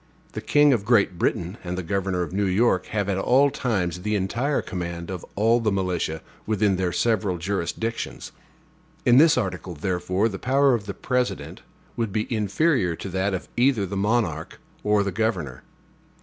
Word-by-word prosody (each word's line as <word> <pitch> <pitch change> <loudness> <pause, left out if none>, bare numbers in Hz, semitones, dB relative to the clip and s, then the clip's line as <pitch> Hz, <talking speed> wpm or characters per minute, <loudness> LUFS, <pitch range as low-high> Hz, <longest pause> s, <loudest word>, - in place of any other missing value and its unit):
The - - -5
king 145 -1 +4
of 110 -5 0
Great 100 -5 +2
Britain 90 +4 -1
and 90 0 -4
the 95 - -3
governor 95 0 -1
of 85 - -7
New 100 0 +1
York 95 -1 +2
have 105 -2 -1
at 95 -1 0
all 135 +7 +4
times 100 - -1
the 105 +2 -1
entire 115 +9 0
command 85 -1 -5
of 90 -2 -5
all 115 +4 +3
the 110 -2 0
militia 90 -4 -2 0.2
within 105 -3 +2
their 90 -1 0
several 105 -1 0
jurisdictions. 100 +5 -3 0.7
In 120 +1 +6
this 160 -2 +6
article, 95 -5 -3
therefore, 90 +5 0
the 95 -4 -5
power 135 +1 +3
of 105 -4 -2
the 100 - -5
President 125 -1 -2 0.3
would 115 -3 -2
be 110 +2 -1
inferior 105 - +1
to 95 - -7
that 95 +1 0
of 90 - -6
either 120 -4 +3
the 100 +1 -5
monarch 100 -6 -1 0.2
or 105 -1 +3
the 100 - -2
governor. 90 - -2
100 Hz, 175 wpm, -24 LUFS, 90-115 Hz, 0.7 s, In